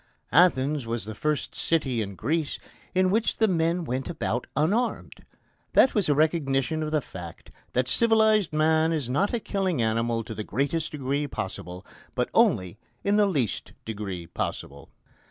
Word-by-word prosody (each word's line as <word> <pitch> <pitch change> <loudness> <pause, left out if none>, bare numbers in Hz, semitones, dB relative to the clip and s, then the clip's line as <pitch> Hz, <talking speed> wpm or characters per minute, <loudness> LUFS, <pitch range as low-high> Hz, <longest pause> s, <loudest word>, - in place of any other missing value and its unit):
Athens 150 -6 +3
was 115 -2 -3
the 110 - -6
first 150 +6 -2
city 135 -8 0
in 100 -2 -5
Greece 155 - -1 0.4
in 185 0 +3
which 225 +2 +1
the 220 - +4
men 170 -1 +1
went 130 0 -3
about 125 -7 -2
unarmed. 200 - 0 0.5
That 265 - +6
was 200 -7 +1
a 145 - +4
recognition 155 -1 +1
of 155 - -2
the 155 -1 +2
fact 90 -8 -10 0.2
that 125 0 +1
civilised 220 - +3
man 160 +1 +3
is 140 -6 -2
not 195 +10 +1
a 240 - 0
killing 195 - -1
animal 115 +1 0
to 110 - -7
the 110 - -5
greatest 140 +9 -1
degree 145 0 -1
possible, 90 - -6 0.3
but - - -1
only 95 +3 +2 0.2
in 200 +1 +2
the 210 -1 +5
least 135 - -2
degree 100 -5 -5
possible. 70 -4 -5
150 Hz, 160 wpm, -26 LUFS, 115-170 Hz, 0.5 s, That